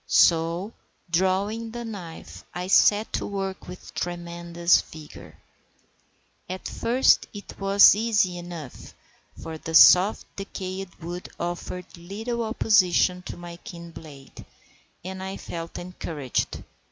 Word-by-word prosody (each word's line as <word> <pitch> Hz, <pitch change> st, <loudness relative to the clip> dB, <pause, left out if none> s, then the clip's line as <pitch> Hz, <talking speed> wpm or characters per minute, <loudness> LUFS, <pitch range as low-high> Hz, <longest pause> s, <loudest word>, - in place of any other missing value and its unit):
So 170 Hz, +5 st, +3 dB, 0.4 s
drawing 195 Hz, +6 st, 0 dB
the 235 Hz, +1 st, -6 dB
knife, 185 Hz, -7 st, -9 dB
I 180 Hz, 0 st, -3 dB
set 205 Hz, +3 st, +4 dB
to -, -, -2 dB
work 195 Hz, -1 st, -4 dB
with 180 Hz, 0 st, -10 dB
tremendous 170 Hz, 0 st, 0 dB
vigour. 155 Hz, -1 st, -12 dB, 1.1 s
At 185 Hz, +1 st, -5 dB
first 245 Hz, +3 st, +3 dB
it 205 Hz, -, -10 dB
was 195 Hz, +1 st, +7 dB
easy 205 Hz, -4 st, +1 dB
enough, 170 Hz, -6 st, -9 dB, 0.4 s
for 160 Hz, -1 st, -7 dB
the 160 Hz, +1 st, -4 dB
soft 185 Hz, +6 st, +7 dB
decayed 190 Hz, -1 st, -6 dB
wood 175 Hz, +2 st, -7 dB
offered 175 Hz, +1 st, -5 dB
little 220 Hz, +7 st, -4 dB
opposition 190 Hz, -5 st, +3 dB
to -, -, -7 dB
my 175 Hz, -1 st, -9 dB
keen 170 Hz, -1 st, -10 dB
blade, 145 Hz, -5 st, -12 dB, 0.6 s
and 190 Hz, 0 st, -6 dB
I 190 Hz, +1 st, -5 dB
felt 165 Hz, -1 st, -7 dB
encouraged. 165 Hz, -7 st, -4 dB
180 Hz, 115 wpm, -25 LUFS, 170-200 Hz, 1.1 s, was